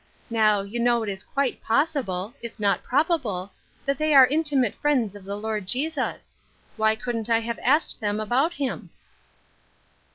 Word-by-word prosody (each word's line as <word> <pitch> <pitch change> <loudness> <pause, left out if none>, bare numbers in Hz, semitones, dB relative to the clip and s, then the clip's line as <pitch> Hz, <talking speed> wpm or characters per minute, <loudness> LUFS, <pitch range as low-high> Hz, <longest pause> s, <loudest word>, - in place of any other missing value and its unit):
Now, 215 -3 +3
you 200 +4 -5
know 235 -1 +2
it 215 - -3
is 195 -1 -3
quite 280 -2 -2
possible 230 - 0
— - - -33
if 235 -1 -8
not 200 -1 +2
probable 250 - 0 0.2
— - - -34
that 275 +1 0
they 310 -1 +2
are 265 -1 +10
intimate 285 -5 +1
friends 255 -9 0
of 200 -2 -11
the 200 +1 -4
Lord 210 -2 -3
Jesus. 275 +6 -3 0.4
Why 220 0 +2
couldn't 230 -1 -3
I 230 0 +3
have 230 0 -4
asked 295 +2 +2
them 205 0 -1
about 255 +10 +1
him?" 280 -5 -4
235 Hz, 170 wpm, -25 LUFS, 210-280 Hz, 0.4 s, are